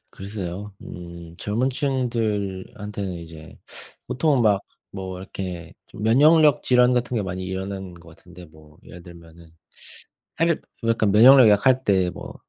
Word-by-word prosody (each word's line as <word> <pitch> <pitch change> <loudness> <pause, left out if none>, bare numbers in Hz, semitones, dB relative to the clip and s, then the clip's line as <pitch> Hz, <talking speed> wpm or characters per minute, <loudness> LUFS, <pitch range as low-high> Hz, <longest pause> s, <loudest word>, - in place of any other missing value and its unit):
글쎄요. 100 0 -7
음. 85 -1 -10
젊은 115 +7 -1
층들한테는 105 -7 -3
이제 80 -2 -12 0.5
보통은 140 -2 +1
막 105 -3 +3 0.3
뭐 95 -1 -6
이렇게 90 -3 -7
좀 110 - -11
면역력 150 +6 +5
질환 125 0 +4
같은 125 0 -1
게 110 - 0
많이 95 -1 -5
일어나는 95 0 -5
것 85 -1 -16
같은데 90 +2 -15
뭐 75 -2 -19
예를 90 - -12
들면은 85 -1 -15 0.9
사실 165 0 +1 0.3
약간 110 -3 +2
면역력 125 +3 +8
약할 130 +6 +3
때 95 -3 +2
뭐 - - -10
100 Hz, 275 characters per minute, -23 LUFS, 90-120 Hz, 0.9 s, 면역력